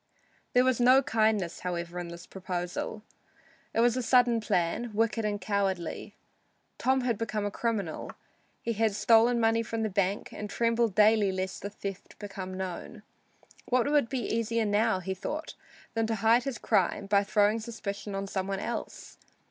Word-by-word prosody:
There 250 - +5
was 255 -2 +2
no 255 +3 +6
kindness, 220 -8 +1
however, 175 -1 -4
in 175 - -5
this 170 0 -9
proposal. 180 +2 -4 0.7
It 230 - +1
was 240 0 +4
a 255 - 0
sudden 245 -1 +4
plan, 195 +4 0
wicked 225 0 +1
and 205 -1 -1
cowardly. 195 -5 -2 0.6
Tom 260 +1 +2
had 240 -4 -1
become 215 -2 -2
a 205 - -2
criminal. 205 -7 -2 0.5
He 230 - -1
had 220 -1 +1
stolen 230 +3 +4
money 225 0 +3
from 225 0 -3
the 215 - -1
bank 195 +1 -1
and 210 - -6
trembled 230 -1 +1
daily 215 -1 +5
lest 185 0 -4
the 200 - -4
theft 200 -2 -8
become 190 -2 -6
known. 190 +4 -6 0.7
What 255 +3 +2
would 290 -6 +3
be 260 -2 -2
easier 230 0 0
now, 210 -1 +2
he 190 +1 -3
thought, 295 - -5 0.4
than 225 -1 0
to 225 - 0
hide 225 +4 +3
his 270 -4 -3
crime, 200 - +1
by 200 0 +3
throwing 205 +2 +2
suspicion 210 -3 -5
on 195 0 -2
some 190 -1 -3
one 195 -1 -2
else? 235 - -6
215 Hz, 170 wpm, -29 LUFS, 195-230 Hz, 0.7 s, no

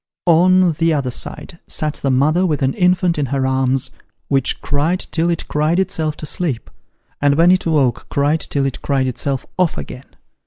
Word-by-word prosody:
On 180 +1 +5
the 165 0 +3
other 135 -3 -1
side 150 +6 -5
sat 155 -1 -2
the 140 - -3
mother 150 +7 +2
with 155 -6 0
an 130 0 +1
infant 180 -2 +2
in 140 - 0
her 135 +1 -1
arms, 130 0 0 0.4
which 135 -2 0
cried 155 +6 0
till 165 +1 0
it 170 - -2
cried 155 +4 +1
itself 160 -5 -1
to - - -7
sleep, 150 -7 -3 0.5
and 145 0 +3
when 170 +3 +5
it 185 -2 +2
'woke, 140 -7 +1
cried 145 +3 +1
till 140 -2 -2
it 135 - -3
cried 135 -2 0
itself 130 +1 -2
off 180 -3 +1
again. 130 +2 -9
150 Hz, 185 wpm, -18 LUFS, 135-170 Hz, 0.5 s, On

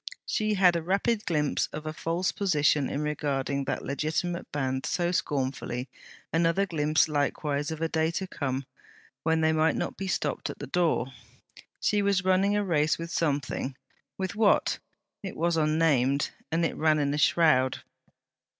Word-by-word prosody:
She 215 0 0
had 180 -3 +5
a 170 - 0
rapid 200 +6 0
glimpse 150 -4 +1
of 150 +1 -8
a 155 - -3
false 170 +3 -1
position 150 -7 +2
in 145 - -2
regarding 140 -2 -1
that - - -2
legitimate 160 +5 -2
band 130 -2 -1
so 175 -1 0
scornfully: 130 -5 -2 0.4
another 165 +4 +2
glimpse 155 -4 +2
likewise 145 -1 -1
of 160 0 -5
a - - +2
day 160 0 +1
to 190 - -2
come 135 -6 -3 0.6
when 160 +1 +1
they 160 0 +3
might 160 +1 +2
not - - -3
be 195 - -4
stopped 180 - -1
at - - -6
the - - -6
door. 160 -7 0 0.7
She 210 -1 +2
was 200 -1 +1
running 195 +2 +3
a 205 - +1
race 155 -4 +2
with 165 0 -6
something; 140 -4 -1 0.4
with 190 0 -3
what? 215 -1 +3 0.4
It 195 - -7
was 170 +1 +1
unnamed; 150 -4 +2 0.2
it 165 +1 0
ran 155 -1 +3
in 145 -1 0
a 150 - -1
shroud. 130 -4 +3
160 Hz, 160 wpm, -28 LUFS, 145-175 Hz, 0.7 s, had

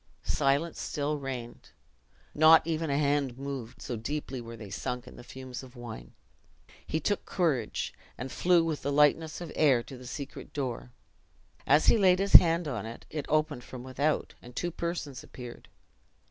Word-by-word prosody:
Silence 140 +5 +1
still 150 0 -2
reigned; 125 -4 -6 0.6
not 160 +1 +7
even 165 -1 -1
a 140 - +1
hand 140 -3 +1
moved, 135 -4 -6
so 120 - -3
deeply 130 +2 -4
were 115 0 -9
they 105 -3 -9
sunk 125 +5 -4
in - - -12
the - - -11
fumes 130 0 -8
of 130 -1 -13
wine. 120 -2 -9 0.7
He 160 - 0
took 205 +6 0
courage, 150 - -1 0.2
and 130 +2 -5
flew 175 -1 +4
with 160 -2 -2
the 140 - -1
lightness 150 +3 +3
of 170 -3 -6
air 135 -6 +4
to 130 0 -10
the 125 - -10
secret 140 +1 -7
door. 130 -4 -3 0.8
As 145 +3 +5
he 230 - +5
laid 185 -2 +5
his 195 +1 -1
hand 170 -1 +8
on 115 -6 -3
it, 115 - -9
it 150 -3 -4
opened 155 -4 +1
from 125 -1 -9
without, 140 +4 -1
and 120 0 -13
two 175 - -2
persons 165 -6 -4
appeared. 125 -2 -10
140 Hz, 175 wpm, -29 LUFS, 125-155 Hz, 0.8 s, hand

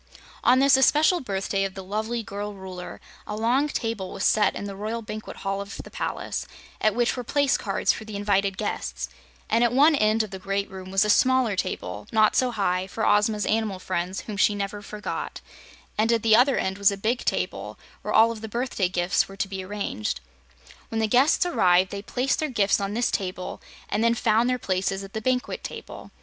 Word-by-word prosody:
On 250 - +5
this 270 0 +6
especial 300 +7 +4
birthday 195 -4 -1
of 195 -1 -3
the 190 - -7
lovely 220 +4 -2
girl 205 0 -5
Ruler, 185 -2 -8 0.3
a - - -4
long 240 +7 +2
table 225 -9 -3
was 195 - -5
set 210 -2 +3
in - - -5
the 200 -1 -5
royal 220 +3 -4
Banquet 215 0 -7
Hall 195 0 -2
of 200 0 -8
the - - -13
palace, - - -3 0.3
at 215 0 +2
which 240 0 +1
were 250 - -4
place 285 +2 +2
cards - - +1
for - - -7
the 215 -1 -8
invited 200 -1 +1
guests, 65 - -3 0.4
and 230 +2 +3
at 240 - +3
one 290 +6 +5
end 215 -2 +3
of 215 - -8
the 190 - -6
great 195 +1 -2
room 190 -1 -8
was 195 +2 +3
a - - -1
smaller 255 -4 +3
table, 190 +2 -4
not 215 -1 +4
so 255 - +3
high, 190 -5 0
for 220 +3 -2
Ozma's 210 0 +3
animal 215 -3 0
friends, 185 0 -3
whom 210 -2 -7
she 205 +1 +3
never 205 0 -4
forgot, 210 0 -5 0.6
and 225 +2 +3
at 230 -2 +1
the 220 -1 +6
other 250 +3 +4
end 190 +1 -2
was 200 0 +6
a 200 - -3
big 225 +5 0
table - - -2 0.2
where - - -4
all 225 +1 +6
of 225 -2 -7
the 220 - -6
birthday 235 -5 -1
gifts 180 0 +1
were 195 - -12
to 200 - -1
be 190 -1 -5
arranged. 185 - -3 0.7
When 225 - -3
the 220 - +2
guests 255 +11 +4
arrived, 185 - +3
they 200 - -4
placed 250 +6 -1
their 310 - -1
gifts 205 -6 +2
on 200 +1 -3
this 240 +1 +1
table 185 -1 -4 0.3
and 215 - 0
then 230 0 +3
found 230 +1 +2
their 250 - +1
places 195 -2 -1
at 195 - -11
the 220 - -3
banquet 250 +2 -1
table. - - -8
210 Hz, 215 wpm, -25 LUFS, 195-235 Hz, 0.7 s, this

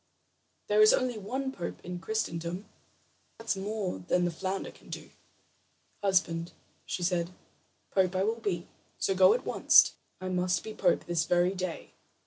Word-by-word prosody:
There 210 +1 +3
is 215 - +8
only 250 -3 -1
one 265 +7 -3
pope 175 -9 -6
in 180 0 -5
Christendom. 175 -1 -3 0.7
That's 225 -2 -1
more 195 - -3
than 175 - +1
the 175 - 0
flounder 190 +3 -3
can - - -19
do." - - -7 0.9
"Husband," 175 -4 +1 0.4
she 180 - -3
said, 175 -1 +1 0.6
"pope 190 -1 +2
I 185 - +2
will 225 +3 0
be; 185 -5 -2 0.3
so 195 - +1
go 190 - +6
at - - -4
once. - - +6 0.3
I 185 - -5
must 180 -1 0
be 220 - -6
pope 180 -4 +2
this 170 -2 0
very 175 +2 +3
day." 185 -3 -5
185 Hz, 155 wpm, -30 LUFS, 175-210 Hz, 0.9 s, is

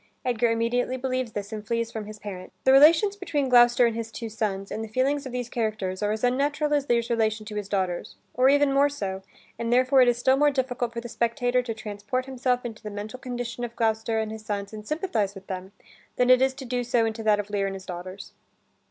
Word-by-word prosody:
Edgar 240 -1 +2
immediately 235 +3 0
believes 255 -3 -2
this 205 +1 -5
and 215 -1 -5
flees 230 +1 -2
from 220 -2 -5
his 215 0 -8
parent. 195 -3 -8
The 265 - +5
relations 320 +9 +6
between 295 -9 -2
Gloucester 240 0 +6
and 230 -1 0
his 225 -1 -5
two 230 0 -6
sons, 200 -3 -3
and 220 - -3
the - - -5
feelings 270 +5 0
of - - -7
these 245 -1 -3
characters 215 -5 -2
are 205 0 +1
as 215 +2 -3
unnatural 290 +4 +1
as 290 -1 0
Lear's 235 -1 +1
relation 220 -1 0
to 210 0 -7
his 205 -1 -4
daughters, 185 -3 -2 0.2
or 255 +2 +4
even 285 0 +4
more 280 +1 +4
so, 195 -9 -4 0.4
and 235 0 -2
therefore 255 +2 +5
it 250 - +6
is 240 -1 +3
still 260 +2 +3
more 295 +1 +5
difficult 250 -3 -1
for 235 0 -5
the 240 - -7
spectator 240 +2 0
to 230 -2 -5
transport 215 +3 -4
himself 250 -1 -1
into 225 -2 -6
the 215 - -6
mental 210 +4 -7
condition 245 -2 -5
of 235 -1 -5
Gloucester 225 0 0
and 220 -1 -1
his 220 0 -8
sons 200 -1 -4
and 215 0 -9
sympathize 235 - -1
with 195 0 -11
them, 185 0 -6 0.4
than 250 0 +4
it 255 0 +6
is 265 0 +2
to 270 -1 -8
do 245 0 -1
so 240 -1 +2
into 225 0 -3
that 215 -1 +3
of 205 0 -5
Lear 200 -1 0
and 195 - -4
his 190 -1 -9
daughters. 185 +2 -8
235 Hz, 240 wpm, -26 LUFS, 215-255 Hz, 0.4 s, relations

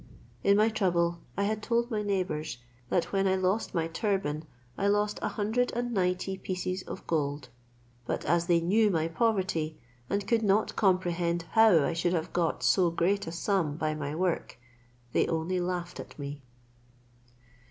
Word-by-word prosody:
In 200 0 +5
my 215 +2 +4
trouble 170 -5 +1 0.2
I 200 - +1
had 215 +1 -1
told 235 +2 0
my 215 -2 0
neighbours, 185 -9 -2 0.3
that 175 - 0
when 195 0 +2
I 190 - +3
lost 190 +3 0
my 165 -1 +1
turban 165 -4 -1 0.3
I 200 - 0
lost 205 +1 +1
a - - 0
hundred 220 +4 0
and 240 0 -2
ninety 185 0 0
pieces 185 0 -3
of - - -8
gold; 145 -3 -1 0.6
but - - -2
as 170 0 +2
they 170 -2 +4
knew 210 +6 +3
my 165 -4 +1
poverty, 180 -6 0 0.3
and 200 0 -1
could 230 -1 +3
not 210 0 +2
comprehend 175 -3 +1
how 220 -9 +6
I 170 - 0
should 175 +1 0
have 165 0 -2
got 170 -2 0
so 180 -3 +4
great 185 +4 0
a - - -3
sum 170 -4 0
by 155 -1 0
my 150 -1 -4
work, 180 0 -1 0.6
they - - +3
only 165 +3 -1
laughed 175 -1 -3
at - - -9
me. 140 0 -6
185 Hz, 170 wpm, -29 LUFS, 165-205 Hz, 0.6 s, how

